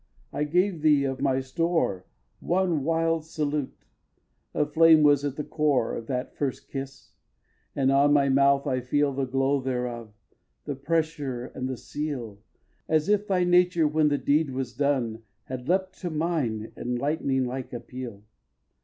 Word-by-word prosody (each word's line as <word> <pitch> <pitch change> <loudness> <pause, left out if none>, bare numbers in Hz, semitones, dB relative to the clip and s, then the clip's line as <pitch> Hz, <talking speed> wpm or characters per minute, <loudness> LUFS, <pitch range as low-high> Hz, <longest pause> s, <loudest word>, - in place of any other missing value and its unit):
I 150 - 0
gave 180 +2 +1
thee 150 -2 +4
of 135 -1 -3
my 135 -2 +2
store 135 - -1 0.3
One 175 -5 0
wild 165 +1 +1
salute. 150 -3 -3 0.7
A 150 - +1
flame 160 +1 +6
was 145 -1 +5
at 145 -2 -2
the 150 - -3
core 145 -7 +1
Of 115 - -7
that 125 0 -3
first 140 -3 -3
kiss; 135 0 -7 0.6
and 135 -1 +2
on 140 +1 +4
my 140 -1 +4
mouth 140 +1 +3
I 130 - 0
feel 140 +3 +1
The 135 0 -1
glow 135 +2 +1
thereof, 125 -3 -3 0.5
the 145 - -2
pressure 140 -3 -2
and 130 0 -5
the 130 - -4
seal, 125 -10 -5 0.5
As 155 +2 +2
if 210 0 +2
thy 185 -2 +2
nature, 175 -2 +4
when 155 0 +2
the 145 -1 +2
deed 150 +2 +1
was 130 -2 -4
done, 130 -6 0 0.2
Had 130 +1 -7
leapt 185 +1 0
to 180 - -3
mine 150 -10 -2
in 125 0 -3
lightning 135 -1 0
like 130 +1 -5
appeal. 120 -3 -8
140 Hz, 160 wpm, -26 LUFS, 130-155 Hz, 0.7 s, flame